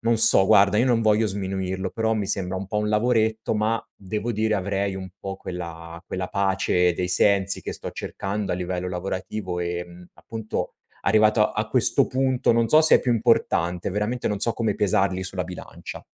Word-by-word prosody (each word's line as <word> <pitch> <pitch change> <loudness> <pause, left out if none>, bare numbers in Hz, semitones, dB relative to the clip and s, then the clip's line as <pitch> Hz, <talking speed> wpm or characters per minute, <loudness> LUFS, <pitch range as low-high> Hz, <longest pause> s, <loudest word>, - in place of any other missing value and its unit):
non 115 0 +1
so 95 -3 +9
guarda, 100 +2 +4
io 120 - +3
non 120 -3 +2
voglio 110 0 +2
sminuirlo, 95 -1 -3
però 110 0 -1
mi 105 -2 -2
sembra 95 -1 -1
un 95 - -5
po' 105 +2 -2
un 105 - -1
lavoretto 110 0 0
ma, 110 +2 -1
devo 105 +4 -4
dire, 110 0 0
avrei 100 0 -2
un 95 -1 -7
po' 95 0 -6
quella 85 -2 -8
quella 90 -1 -4
pace 95 -3 +1
dei 90 +1 -3
sensi 100 +1 +2
che - - -6
sto - - -6
cercando 100 0 -5
a - - 0
livello 90 0 -4
lavorativo 95 +1 -5
e, 85 0 -3
mhmm, 90 +1 -14
appunto, 110 -1 -6 0.3
arrivato 110 +1 +3
a 105 0 -3
questo 125 +3 +3
punto, 130 -1 0
non 115 0 +2
so 155 +6 +6
se 160 - +6
è - - -3
più 125 - 0
importante. 110 -7 0
Veramente 105 +5 -2
non 105 - -1
so 115 - +3
come 115 -2 -1
pesarli 95 -2 0
sulla 95 -1 -2
bilancia. 90 +1 -9
100 Hz, 190 wpm, -23 LUFS, 95-110 Hz, 0.3 s, so